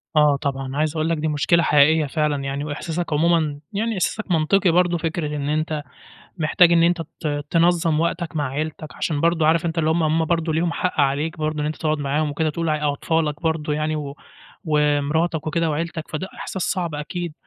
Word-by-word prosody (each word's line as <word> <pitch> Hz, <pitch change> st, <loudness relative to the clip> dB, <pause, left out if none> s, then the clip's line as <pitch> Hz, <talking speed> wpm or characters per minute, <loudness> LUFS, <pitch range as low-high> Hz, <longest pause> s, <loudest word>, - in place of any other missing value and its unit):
آه 150 Hz, -1 st, +5 dB
طبعًا. 135 Hz, -1 st, -3 dB
عايز 155 Hz, +1 st, 0 dB
أقول 155 Hz, 0 st, 0 dB
لك 165 Hz, -, +1 dB
دي 155 Hz, +1 st, -1 dB
مشكلة 155 Hz, +3 st, +2 dB
حقيقية 150 Hz, +1 st, +4 dB
فعلًا 150 Hz, -1 st, -1 dB
يعني 135 Hz, +1 st, -3 dB
وإحساسك 160 Hz, +3 st, -3 dB
عمومًا 155 Hz, -2 st, +2 dB
يعني 225 Hz, +3 st, -1 dB
إحساسك 200 Hz, +1 st, -2 dB
منطقي 175 Hz, +4 st, +3 dB
برضو، 175 Hz, 0 st, +3 dB
فكرة 165 Hz, -1 st, -2 dB
إن 145 Hz, -1 st, -3 dB
أنت 155 Hz, 0 st, -1 dB, 0.6 s
محتاج 170 Hz, +2 st, +4 dB
إن 170 Hz, -1 st, +5 dB
أنت 170 Hz, 0 st, +2 dB, 0.2 s
ت 145 Hz, -2 st, -2 dB
تنظّم 165 Hz, -2 st, +3 dB
وقتك 170 Hz, 0 st, -2 dB
مع 145 Hz, -3 st, 0 dB
عيلتك، 155 Hz, +3 st, -5 dB
عشان 150 Hz, -3 st, -2 dB
برضو 165 Hz, 0 st, +2 dB
عارف 160 Hz, +2 st, +3 dB
أنت 165 Hz, 0 st, -2 dB
اللي 160 Hz, -1 st, +2 dB
هُم 165 Hz, +1 st, +2 dB
هُم 160 Hz, +1 st, +2 dB
برضو 165 Hz, 0 st, 0 dB
ليهم 165 Hz, +2 st, 0 dB
حق 180 Hz, -3 st, -1 dB
عليك 145 Hz, +4 st, 0 dB
برضو، 155 Hz, 0 st, -2 dB
إن 150 Hz, -, -1 dB
أنت 155 Hz, -, -3 dB
تقعد 155 Hz, -1 st, -1 dB
معاهم 145 Hz, +2 st, 0 dB
وكده 155 Hz, +2 st, 0 dB
تقول 165 Hz, +2 st, -3 dB
أع 150 Hz, -1 st, +1 dB
أطفالك 155 Hz, +1 st, -1 dB
برضو 160 Hz, -2 st, -1 dB
يعني 155 Hz, +1 st, -1 dB
و 145 Hz, -1 st, -5 dB, 0.5 s
ومراتك 150 Hz, +1 st, +1 dB
وكده 165 Hz, 0 st, 0 dB
وعِيلتك، 165 Hz, +1 st, -3 dB
فده 180 Hz, +5 st, -4 dB
إحساس 190 Hz, -, -5 dB
صعب 175 Hz, -4 st, -1 dB
أكيد. 165 Hz, +3 st, -4 dB
155 Hz, 195 wpm, -22 LUFS, 150-170 Hz, 0.6 s, آه